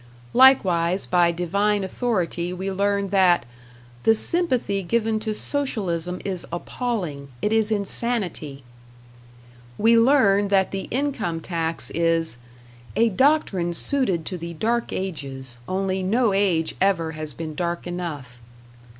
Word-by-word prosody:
Likewise 185 -9 +4
by 175 -1 +3
divine 200 +4 0
authority 180 -5 -2
we 190 +2 -4
learn 200 +1 0
that 185 -7 +3 0.6
"the 225 - +4
sympathy 250 - +1
given 220 +3 0
to 215 0 -3
Socialism 190 - -2
is 185 -3 -3
appalling. 175 - -4
It 210 - 0
is 220 -1 +3
insanity." 200 - -1 1.1
We 230 +1 +5
learn 220 -6 +4
that 195 -1 +2
the 195 -1 -4
income 250 - -2
tax 165 -1 -3
is 165 -5 0 0.6
"a 230 +2 +3
doctrine 200 - +1
suited 195 - +1
to 180 -2 -4
the 170 0 -6
dark 230 +7 -1
ages, 135 -9 -5
only 190 0 -1
no 215 +3 +2
age 185 -5 +1
ever 175 -5 +2
has 155 -1 -1
been 160 +1 -6
dark 170 +2 -3
enough." 150 -9 -6
190 Hz, 125 wpm, -23 LUFS, 170-220 Hz, 1.1 s, We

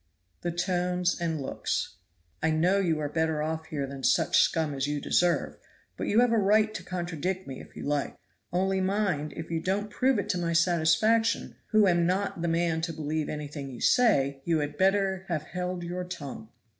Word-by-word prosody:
The 175 - -2
tones 180 0 0
and 165 -2 -1
looks. 135 - -2 0.5
"I 160 - +2
know 175 +5 +3
you 165 -5 +1
are 150 - -1
better 160 0 0
off 160 +1 -3
here 145 -3 -3
than 135 0 -8
such - - +3
scum 160 -3 +1
as 135 0 -1
you 145 0 -1
deserve, 175 +3 +1 0.4
but - - -4
you 220 +3 +4
have 245 -1 +3
a 230 - +3
right 215 +2 +3
to 185 - -5
contradict 180 +1 -3
me 135 -1 -7
if - - -15
you - - -7
like; 145 -1 -1 0.3
only 190 +1 +1
mind, 190 -6 0
if 160 +1 -7
you 165 - 0
don't 205 +4 -1
prove 260 +2 +2
it 200 0 -2
to 180 -3 0
my 170 -1 -1
satisfaction, 175 +7 +2
who 215 -2 +4
am 175 -2 +3
not 185 -1 -1
the 170 - 0
man 165 -1 +1
to 165 0 -2
believe 155 0 -2
anything 145 -2 -5
you 125 - -9
say, 140 - +3
you 165 +1 +1
had 145 -1 -2
better 190 +1 +1
have 165 -4 -2
held 180 -1 -4
your 180 +1 -4
tongue." 145 -10 -7
175 Hz, 195 wpm, -28 LUFS, 155-190 Hz, 0.5 s, you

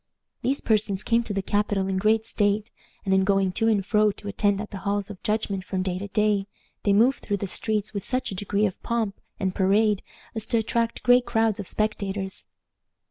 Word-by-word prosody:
These 275 +2 0
persons 210 -2 +1
came 230 +1 +3
to - - -5
the 195 -1 -1
capital 205 -1 0
in 190 -1 0
great 220 +2 +2
state, 210 -1 0 0.3
and, 190 - +2
in 190 0 +4
going 195 -1 +2
to 225 +5 0
and 205 -4 +2
fro 210 0 +3
to 205 - -11
attend 205 0 +1
at 210 - -6
the 200 - -6
halls 200 +1 -2
of 190 - -11
judgment 210 -3 -1
from 185 -1 -2
day 185 -1 -2
to 200 - -5
day, 205 -1 +1 0.3
they 205 - +2
moved 235 +7 +4
through 205 - -2
the 200 - -3
streets 210 +2 -2
with 200 -2 -3
such 255 -3 -1
a - - -4
degree 205 +2 0
of 190 - -3
pomp 225 -4 -2 0.2
and 190 -1 0
parade 205 +2 +3 0.3
as 220 -2 -3
to 235 - +2
attract 230 +1 -1
great 245 0 +5
crowds 225 -3 +1
of 200 - -5
spectators. 200 -2 -2
205 Hz, 210 wpm, -25 LUFS, 195-220 Hz, 0.3 s, great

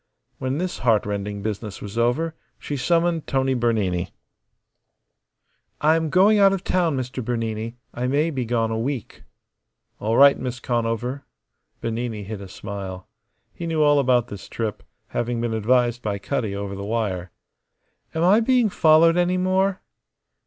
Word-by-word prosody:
When 130 +2 -2
this 180 +2 -3
heartrending 105 -3 0
business 105 -1 -4
was 100 0 -8
over 125 +8 +1 0.2
she 145 - -5
summoned 165 +4 +1
Tony 135 0 +1
Bernini. 105 -7 0 1.6
"I 155 +2 +4
am 160 -1 0
going 200 +5 +5
out 195 -1 +6
of 195 -1 -2
town, 170 -6 +1
Mr. 130 0 -4
Bernini. 115 0 -3 0.2
I 125 +1 -2
may 150 +5 +1
be 130 -4 -2
gone 115 -1 0
a 110 - -1
week." 130 0 -4 0.8
"All 110 +2 0
right, 140 0 +7
Miss 125 -1 -4
Conover." 120 +3 -2 0.5
Bernini 115 -2 -3
hid 100 0 -6
a 100 - -8
smile. 95 -1 -7 0.5
He 170 - -6
knew 160 -2 +1
all 145 -1 +5
about 125 -3 +2
this 100 -2 -9
trip, 110 -3 -3 0.3
having 120 0 -2
been 115 -1 -1
advised 120 +2 +2
by 105 -3 -2
Cutty 105 -1 -2
over 100 0 -4
the 100 0 -6
wire. 100 -5 -2 0.9
"Am 160 - +1
I 195 +5 +6
being 240 -1 +3
followed 165 -1 +5
any 180 +1 +2
more?" 190 +1 +1
120 Hz, 150 wpm, -23 LUFS, 110-155 Hz, 1.6 s, right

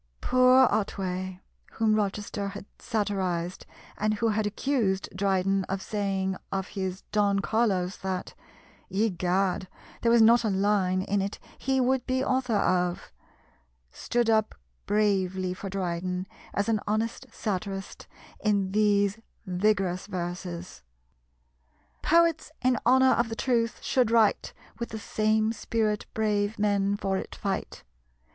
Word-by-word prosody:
Poor 255 +1 +5
Otway, 185 -3 -2 0.3
whom 220 -1 +2
Rochester 205 -1 -1
had 200 0 -7
satirised, 190 -6 -2 0.3
and 215 +1 +1
who 225 +2 +1
had 215 0 0
accused 210 -3 0
Dryden 195 0 +1
of 195 +1 -3
saying 195 -2 -1
of 195 0 -2
his 190 -2 -4
Don 205 -1 +2
Carlos 195 -4 0
that, 190 -1 -4 0.6
"Egad, 190 -2 0 0.3
there 230 - +3
was 235 -1 +6
not 235 +2 +6
a 220 - +1
line 190 -2 +1
in 200 0 0
it 200 +1 -3 0.2
he 265 0 0
would 260 0 +1
be 260 0 +1
author 255 -4 0
of," 180 -3 0 0.8
stood 240 -1 -1
up 220 -1 +2 0.3
bravely 190 -3 +1
for 195 +1 -7
Dryden 180 -1 -2 0.3
as 200 - -1
an 225 -2 +2
honest 225 +4 -1
satirist 195 -2 -4 0.4
in 200 -3 +1
these 205 0 +2 0.3
vigorous 185 -1 0
verses: 175 - -5 1.2
"Poets 335 -1 +3
in 250 -2 +3
honour 260 +1 +6
of 235 -1 +2
the 225 - -4
truth 235 -1 0
should 250 -4 +2
write, 225 -2 +3 0.3
With 235 - -3
the 220 - -5
same 215 +1 +1
spirit 215 -1 -1
brave 210 -1 0
men 200 -1 +1
for 195 -1 -1
it - - -6
fight. 195 -2 -4
205 Hz, 130 wpm, -27 LUFS, 190-225 Hz, 1.2 s, was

